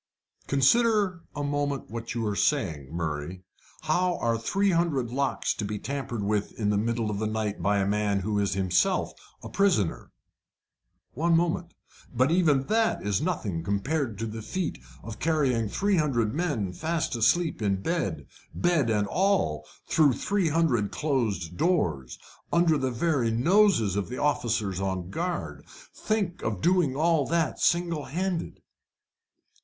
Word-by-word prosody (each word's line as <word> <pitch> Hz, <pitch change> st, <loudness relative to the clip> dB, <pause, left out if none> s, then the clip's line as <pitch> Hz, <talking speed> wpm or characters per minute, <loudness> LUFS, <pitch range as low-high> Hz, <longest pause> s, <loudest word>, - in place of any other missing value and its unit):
"Consider 200 Hz, -, +3 dB
a 145 Hz, -, -3 dB
moment 145 Hz, -3 st, -2 dB
what 115 Hz, 0 st, -5 dB
you 115 Hz, -1 st, -1 dB
are 105 Hz, -1 st, -1 dB
saying, 80 Hz, -, 0 dB
Murray. 85 Hz, +2 st, -4 dB, 0.4 s
How 175 Hz, +3 st, +1 dB
are 115 Hz, -1 st, 0 dB
three 195 Hz, -, +1 dB
hundred 155 Hz, -9 st, 0 dB
locks 135 Hz, +1 st, 0 dB
to -, -, -5 dB
be 105 Hz, +1 st, -3 dB
tampered 130 Hz, -3 st, -4 dB
with 105 Hz, 0 st, -1 dB
in 105 Hz, -2 st, +1 dB
the 105 Hz, -, +1 dB
middle 115 Hz, 0 st, -1 dB
of 100 Hz, -, -3 dB
the 110 Hz, -, -1 dB
night 110 Hz, -1 st, -2 dB
by 100 Hz, 0 st, +2 dB
a 100 Hz, -, +1 dB
man 100 Hz, 0 st, 0 dB
who 105 Hz, +2 st, -1 dB
is 100 Hz, -1 st, 0 dB
himself 95 Hz, -2 st, +1 dB, 0.3 s
a -, -, -6 dB
prisoner? 180 Hz, -, +1 dB, 1.0 s
One 165 Hz, +4 st, +2 dB
moment 175 Hz, +1 st, -1 dB, 0.4 s
But 130 Hz, +4 st, +2 dB
even 155 Hz, -6 st, +3 dB
that 225 Hz, -, 0 dB
is 100 Hz, -2 st, 0 dB
nothing 110 Hz, -, -2 dB
compared 110 Hz, -, -1 dB
to 115 Hz, -, -3 dB
the 110 Hz, 0 st, -6 dB
feat 185 Hz, -, -3 dB, 0.2 s
of 110 Hz, 0 st, -8 dB
carrying 135 Hz, -9 st, +1 dB
three 200 Hz, -, +1 dB
hundred 120 Hz, -8 st, +1 dB
men 145 Hz, -, -1 dB
fast 160 Hz, -, -2 dB
asleep 135 Hz, +6 st, +2 dB
in 100 Hz, -2 st, 0 dB
bed 165 Hz, -, -2 dB, 0.3 s
bed 170 Hz, -8 st, +2 dB
and 105 Hz, -2 st, +1 dB
all 100 Hz, -, 0 dB, 0.2 s
through 155 Hz, -5 st, +4 dB
three 195 Hz, -, 0 dB
hundred 145 Hz, -10 st, +1 dB
closed 110 Hz, -, -1 dB
doors, 85 Hz, -, 0 dB, 0.3 s
under 170 Hz, -2 st, +4 dB
the 130 Hz, -3 st, 0 dB
very 130 Hz, -1 st, 0 dB
noses 125 Hz, -, +3 dB
of 100 Hz, -1 st, -2 dB
the 125 Hz, -, -5 dB
officers 110 Hz, -9 st, 0 dB
on 95 Hz, -2 st, -3 dB
guard 175 Hz, -, -3 dB, 0.3 s
think 200 Hz, -5 st, -2 dB
of 105 Hz, -4 st, -2 dB
doing 175 Hz, -, +2 dB
all 160 Hz, 0 st, +2 dB
that 165 Hz, -1 st, 0 dB
singlehanded!" 170 Hz, +1 st, -1 dB
130 Hz, 150 wpm, -27 LUFS, 105-170 Hz, 1.0 s, through